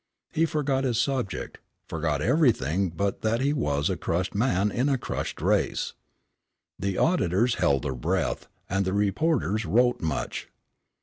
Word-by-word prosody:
He 165 +1 +2
forgot 140 -3 0
his 120 -3 +1
subject, 120 - -2 0.3
forgot 75 -2 -1
everything 100 - +2
but 100 +4 -2
that 110 +1 +1
he 140 +3 +1
was 75 - 0
a - - 0
crushed 90 +2 -2
man 105 -2 +1
in 130 +7 +1
a 135 - +2
crushed - - -4
race. - - +1 0.9
The 100 0 -1
auditors 120 - +2
held 70 -1 +3
their 70 -2 -2
breath, - - -1 0.2
and 95 +1 0
the 95 0 -1
reporters 105 - +1
wrote 120 +8 +2
much. 80 -4 -3
105 Hz, 145 wpm, -26 LUFS, 85-130 Hz, 0.9 s, held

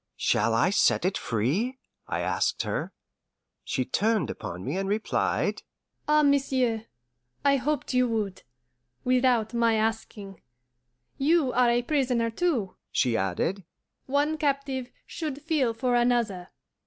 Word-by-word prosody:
"Shall 115 +2 +2
I 165 +11 +3
set 195 - +3
it 185 - +1
free?" 145 - -1 0.3
I - - -2
asked - - 0
her. - - -3 0.7
She - - -1
turned 215 - +1
upon 90 +1 -7
me 140 +6 -2
and 195 0 -2
replied, 215 +2 0 0.5
"Ah, 300 0 +4
monsieur, 260 -5 +1 0.6
I 280 0 +5
hoped 280 +1 -2
you 250 0 +3
would 215 -5 -2 0.6
without 250 -3 +2
my 230 -1 +3
asking. 215 -3 -3 0.8
You 290 -2 +3
are 245 -1 +4
a 240 +1 +2
prisoner 250 -5 +1
too," 235 - -1
she 125 -3 +1
added; 105 - -1 0.4
"one 290 +3 +1
captive 275 -3 -1 0.2
should 300 -4 -5
feel 295 -6 +1
for 245 +2 -1
another." 235 -7 +1
240 Hz, 130 wpm, -27 LUFS, 200-270 Hz, 0.8 s, I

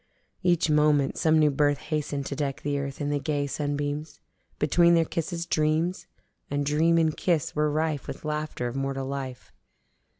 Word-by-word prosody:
Each 175 -3 +2
moment 150 -2 +3
some 160 -1 +4
new 150 -1 +4
birth 145 +1 +2
hasten'd 150 -2 -3
to 140 - -4
deck 140 -1 -3
the 145 -1 -1
earth 140 -1 -5
in 145 0 -1
the 145 - 0
gay 145 -1 -1
sunbeams. 145 +1 -3 0.4
Between 170 +3 +4
their 165 -1 +3
kisses 170 +2 -3
dreams: 160 +2 0 0.4
And 145 0 -1
dream 160 +3 +3
and 160 -2 +2
kiss 165 -3 0
were 150 0 +2
rife 155 -2 -1
with - - -7
laughter 150 -4 -3
of 120 - -5
mortal 135 0 -2
life. 135 -2 -6
150 Hz, 170 wpm, -27 LUFS, 140-160 Hz, 0.4 s, some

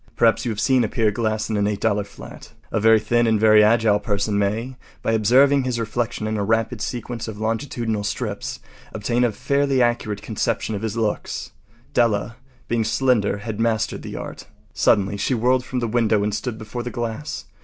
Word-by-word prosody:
Perhaps 115 +1 +3
you 120 - 0
have 105 - -4
seen 130 +2 +3
a - - +1
pier 110 0 +1
glass 110 0 -1
in 110 - -1
an 100 - +1
$8 105 0 0
flat. - - -12 0.2
A - - +1
very 110 +1 +5
thin 120 +2 +1
and 110 -1 +2
very 110 0 +6
agile 110 -1 +4
person 105 0 -1
may, 110 +6 -1 0.3
by - - +1
observing 130 +6 +4
his 125 -2 -2
reflection 115 -1 -2
in 110 0 -1
a 100 - 0
rapid 115 +1 0
sequence 120 +2 -4
of 110 -2 -6
longitudinal 115 -1 -2
strips, 105 - -4 0.4
obtain 120 +3 0
a 120 - +2
fairly 140 +4 +1
accurate 120 -4 0
conception 110 0 -2
of 100 - -3
his 110 0 -3
looks. 110 -2 -2 0.4
Della, 115 0 +1 0.3
being 115 -1 +1
slender, 115 -4 +1
had 105 +1 -6
mastered 115 -2 0
the - - -7
art. - - -7 0.3
Suddenly 100 0 +2
she 125 +6 0
whirled 125 +2 +2
from 130 - -5
the 120 - 0
window 110 -2 +2
and 105 0 -1
stood 110 +1 -3
before 115 +2 -6
the 125 - -4
glass. 120 +5 -4
110 Hz, 190 wpm, -22 LUFS, 105-120 Hz, 0.4 s, very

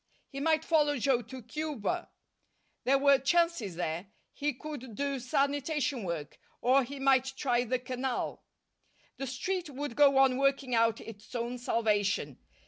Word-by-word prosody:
He 275 - -6
might 315 +1 +2
follow 295 -3 +3
Joe 255 0 +2
to 250 +2 -10
Cuba. 305 - -3 0.8
There 275 +2 +4
were 280 0 +5
chances 275 - +1
there. 170 +2 -3 0.3
He 295 0 -1
could 260 -4 -8
do 280 +1 -1
sanitation 280 +1 0
work, 165 -4 -5 0.2
or 265 +2 +4
he 275 +3 -7
might 265 -1 +3
try 245 -2 +1
the 255 +2 0
Canal. 255 0 -3 0.8
The 270 - -4
Street 345 +7 -3
would 285 -2 -5
go 280 -2 +5
on 265 -1 +5
working 275 -1 +1
out 230 -1 +3
its 220 +1 -11
own 240 +1 -3
salvation. 205 - 0
265 Hz, 145 wpm, -30 LUFS, 235-285 Hz, 0.8 s, were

